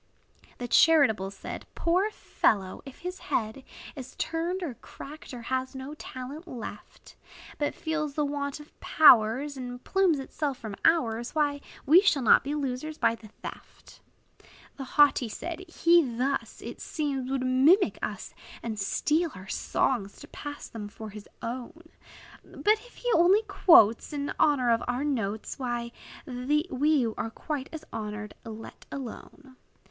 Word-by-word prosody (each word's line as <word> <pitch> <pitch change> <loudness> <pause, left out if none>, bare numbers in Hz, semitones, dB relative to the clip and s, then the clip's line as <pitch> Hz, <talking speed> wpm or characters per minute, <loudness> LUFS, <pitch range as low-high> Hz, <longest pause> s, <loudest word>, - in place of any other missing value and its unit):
The 245 - -4
charitable 240 -10 +5
said, 195 -1 -8
"Poor 365 +5 +2
fellow! 195 - 0
if 270 - -10
his 360 +1 -5
head 220 +4 -2 0.3
Is 260 -2 -9
turned, 340 +3 -2
or 300 -7 -3
cracked, 295 +6 -11
or 245 -2 -8
has 260 +2 -2
no 265 +2 -6
talent 290 +3 -8
left; 230 -7 -9 0.4
But 290 - -1
feels 310 -3 -2
the 300 - +1
want 285 0 -3
of 295 - -14
powers, 260 0 +5
And 245 -1 -7
plumes 380 -5 +2
itself 275 0 -3
from 220 -5 -7
ours, 240 -7 +2
Why, 290 -2 +1 0.2
we 325 +7 +8
shall 320 -9 +2
not 225 - +6
be 285 +2 -2
losers 290 +2 -3
by - - +3
the 225 -1 -11 0.2
theft." - - -11 0.7
The 270 - -6
haughty 275 -3 +4
said, 340 - -6
"He 340 0 +5
thus, 260 0 -2
It - - -8
seems, 275 -5 -2
would 265 -1 -1
mimic 285 +10 +4
us, - - -5 0.3
And 220 -3 -4
steal 310 - +1
our 190 +1 -11
songs, 205 -6 -1
to 290 - -10
pass 290 -1 -7
them 215 -2 -7
for 215 +1 -9
his 210 +1 -11
own! 260 +8 -6 0.5
But 430 +1 +1
if - - -20
he - - -2
only 370 +6 +5
quotes 265 - +5
In 285 -1 -2
honor 265 -5 +4
of 230 - +2
our 245 +3 -1
notes, 225 -8 -2
We 240 -2 -3 0.3
then 275 -1 +1
were 225 - -3
quite 280 +3 -5
as 315 -1 -8
honored, 210 -1 -5
let 225 -1 -10
alone." 265 +1 -9
270 Hz, 150 wpm, -28 LUFS, 235-310 Hz, 0.7 s, we